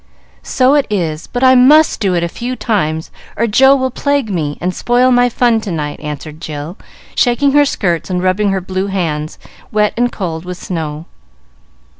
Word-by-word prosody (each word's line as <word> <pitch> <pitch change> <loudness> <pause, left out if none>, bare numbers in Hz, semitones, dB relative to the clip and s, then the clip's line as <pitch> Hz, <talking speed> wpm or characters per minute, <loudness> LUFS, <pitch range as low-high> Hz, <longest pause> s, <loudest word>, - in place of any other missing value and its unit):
"So 255 +1 +2
it 290 -2 +2
is; 165 -6 -2
but 245 +1 -3
I 260 0 +7
must 290 +5 +5
do 190 -3 0
it 170 - 0
a - - 0
few 245 +8 -5
times, 160 -10 -2 0.3
or 230 - +1
Joe 265 +5 +5
will 260 -1 -1
plague 280 -4 -1
me 150 -5 -2
and 180 +1 -2
spoil 245 +4 +2
my 245 0 +4
fun 235 -1 +1
to 205 - -5
night," 150 -3 -4
answered 150 +1 -7
Jill, 155 +1 -6 0.4
shaking 265 +3 +2
her 290 +1 +4
skirts 175 - -1
and 180 -1 -1
rubbing 195 +3 +1
her 195 -1 -1
blue 190 +1 -3
hands, 160 -6 -3 0.3
wet 210 -1 +1
and 245 +1 0
cold 165 -5 -4
with 180 0 -7
the - - -11
snow. 160 -3 -4
195 Hz, 190 wpm, -15 LUFS, 165-245 Hz, 0.4 s, I